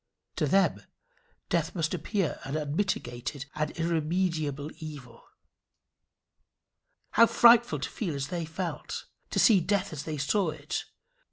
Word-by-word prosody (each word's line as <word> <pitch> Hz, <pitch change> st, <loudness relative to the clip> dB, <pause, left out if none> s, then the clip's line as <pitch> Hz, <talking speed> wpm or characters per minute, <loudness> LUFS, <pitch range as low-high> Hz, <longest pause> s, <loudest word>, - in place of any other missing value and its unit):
To 150 Hz, -, +1 dB
them 195 Hz, +6 st, +3 dB, 0.7 s
death -, -, 0 dB
must 165 Hz, -1 st, 0 dB
appear 180 Hz, 0 st, -1 dB
an 135 Hz, +3 st, -3 dB
unmitigated 145 Hz, -4 st, -2 dB
and 155 Hz, 0 st, -1 dB
irremediable 160 Hz, -3 st, -1 dB
evil. 140 Hz, -7 st, -9 dB, 1.9 s
How 230 Hz, +1 st, +6 dB
frightful 235 Hz, +1 st, +6 dB
to -, -, -3 dB
feel 175 Hz, -9 st, -3 dB
as 140 Hz, 0 st, -3 dB
they 175 Hz, -2 st, -2 dB
felt! 165 Hz, +2 st, -5 dB, 0.2 s
to -, -, -4 dB
see 215 Hz, -6 st, +6 dB
death 200 Hz, +1 st, 0 dB
as 145 Hz, -, -6 dB
they 155 Hz, -1 st, -3 dB
saw 170 Hz, +6 st, +1 dB
it! 150 Hz, -1 st, -4 dB
160 Hz, 125 wpm, -29 LUFS, 145-190 Hz, 1.9 s, How